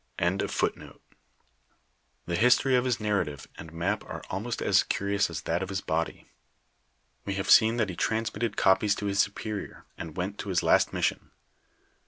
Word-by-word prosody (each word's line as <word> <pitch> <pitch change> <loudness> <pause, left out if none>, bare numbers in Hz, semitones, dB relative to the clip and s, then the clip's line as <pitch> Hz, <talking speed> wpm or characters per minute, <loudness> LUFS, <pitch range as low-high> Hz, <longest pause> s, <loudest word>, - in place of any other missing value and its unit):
* - - -42
The 90 +3 0 1.5
history 125 +8 +4
of 125 0 +2
his 125 -4 0
narrative 95 -10 -2
and 80 - -9
map 85 +1 -2
are - - -7
almost 110 +6 -3
as - - +4
cnrions 100 -1 0
as 85 - -5
that 85 +2 -1
of 95 - -4
his 95 -1 -2
body. 80 +1 -2 1.0
We 100 - -3
have 95 - -1
seen 110 +2 +6
tliat 110 -4 +1
he 90 - -5
transmitted 110 +4 -1
copies 100 +2 +3
to 105 - -5
his 100 0 -1
superior, 105 +1 -2
and 80 -2 -7
went 95 +3 -3
to - - -5
his 90 -3 +1
last - - +4
mission. - - -1
100 Hz, 165 wpm, -28 LUFS, 90-110 Hz, 1.5 s, seen